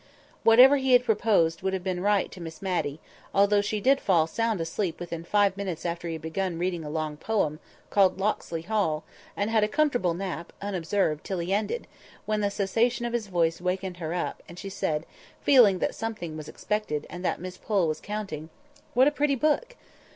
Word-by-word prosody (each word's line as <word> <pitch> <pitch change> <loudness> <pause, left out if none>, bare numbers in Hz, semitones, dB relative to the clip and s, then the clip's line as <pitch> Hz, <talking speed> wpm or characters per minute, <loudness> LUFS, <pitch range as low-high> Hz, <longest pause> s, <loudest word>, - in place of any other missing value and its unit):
Whatever 250 +5 +8
he 265 -1 +2
had 245 0 +6
proposed 205 -7 +2
would 190 +1 -1
have 190 -2 -2
been 180 -1 -2
right 205 -1 +2
to 185 - -10
Miss 165 -1 -8
Matty; 175 -6 -2 0.4
although 200 +1 +4
she 210 +1 -2
did 270 +6 +3
fall 170 -5 +3
sound 225 +4 -1
asleep 165 +1 -2
within 170 -1 -5
five 200 +2 +2
minutes 190 -5 -4
after 170 0 -3
he 165 - -3
had 160 - -9
begun 170 +1 -2
a 175 -4 -2
long 155 -1 -3
poem, 155 -6 -1 0.3
called 195 -2 +4
"Locksley 190 -5 -2
Hall," 170 -6 0 0.3
and 205 +2 0
had 220 -2 +3
a - - +3
comfortable 245 - +1
nap, 175 -2 -5
unobserved, 185 -5 -1
till 190 - -3
he 175 +2 -1
ended; 215 - -1 0.4
when 215 0 0
the 205 - +1
cessation 225 +5 0
of 240 - -3
his 230 -3 -1
voice 170 -3 0
wakened 185 0 -2
her 165 -2 -4
up, 175 0 -3
and 170 - -11
she 195 - -6
said, 160 -5 -2 0.4
feeling 235 -9 +6
that - - -1
something 215 -8 -5
was 155 -1 -7
expected, 210 -9 -2
and 175 +1 -8
that - - 0
Miss 185 +1 -7
Pole 195 -6 +1
was 155 0 -2
counting— 195 -7 -5 0.5
"What 260 +3 +6
a - - +4
pretty 290 -1 +1
book!" 310 - 0
190 Hz, 195 wpm, -27 LUFS, 170-215 Hz, 0.5 s, Whatever